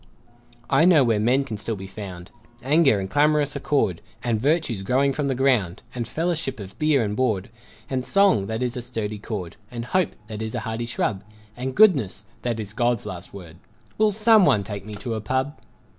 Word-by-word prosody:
I 160 - +4
know 170 -6 +6
where 115 -4 +2
Men 125 +6 +3
can 115 -6 -5
still 110 +2 -3
be 95 -1 -8
found, 95 -2 -9 0.3
Anger 140 -5 +4
and 95 - -3
clamorous 145 +3 +2
accord, 135 - 0 0.2
And 115 -3 0
virtues 140 - +1
growing 135 +7 +2
from 145 0 -1
the 135 - 0
ground, 125 -10 +1
And 120 -2 -4
fellowship 160 -4 -2
of 95 -1 -9
beer 150 -5 +3
and 105 -1 -2
board, 110 -4 0 0.4
And 130 -2 -2
song, 195 - +3
that 110 +3 -2
is 125 -1 -2
a 125 - -3
sturdy 110 -3 -4
cord. 100 -5 -6
And 120 -1 -6
hope, 185 +6 0
that 110 0 -7
is 110 +2 -4
a 120 - -2
hardy 115 +1 -4
shrub, 110 -4 -1 0.3
And 130 +1 -4
goodness, 135 - +4 0.2
that 120 -2 -2
is 105 -1 -6
God's 120 -1 0
last 90 0 -7
word 85 -4 -11 0.4
Will 215 -1 +4
someone 210 - +5
take 100 0 -7
me 105 - -6
to 115 +3 -4
a 110 - -3
pub? 130 +6 -2
120 Hz, 195 wpm, -24 LUFS, 105-140 Hz, 0.4 s, know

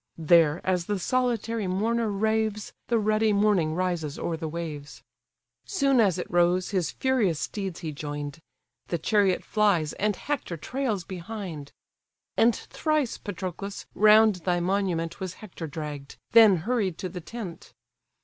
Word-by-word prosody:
There 165 -1 +4
as 180 -2 0
the 205 - 0
solitary 230 -1 0
mourner 220 +5 0
raves, 215 0 -1
The 235 - +2
ruddy 215 0 +2
morning 200 -6 +2
rises 175 -5 -2
o'er 170 - -2
the 160 0 -4
waves: 155 -3 -6 0.6
Soon 275 -9 +2
as 195 -6 +3
it 180 - -3
rose, 175 +2 +2
his 185 -5 0
furious 225 - +1
steeds 195 -5 -4
he 160 -3 -4
join'd! 145 0 -6 0.5
The 170 - -1
chariot 195 +2 +2
flies, 200 -8 +2
and 210 0 0
Hector 265 - -3
trails 235 - -2
behind. 180 -5 -7 0.6
And 230 0 +4
thrice, 305 -6 -1
Patroclus! 195 +1 -6
round 215 -1 +6
thy 175 0 0
monument 175 -2 -1
Was 185 -2 -5
Hector 180 -6 -8
dragg'd, 145 -2 -7 0.2
then 220 -4 +8
hurried 210 -8 0
to 185 - -4
the 180 -1 -7
tent. 195 -2 -8
190 Hz, 140 wpm, -26 LUFS, 170-215 Hz, 0.6 s, then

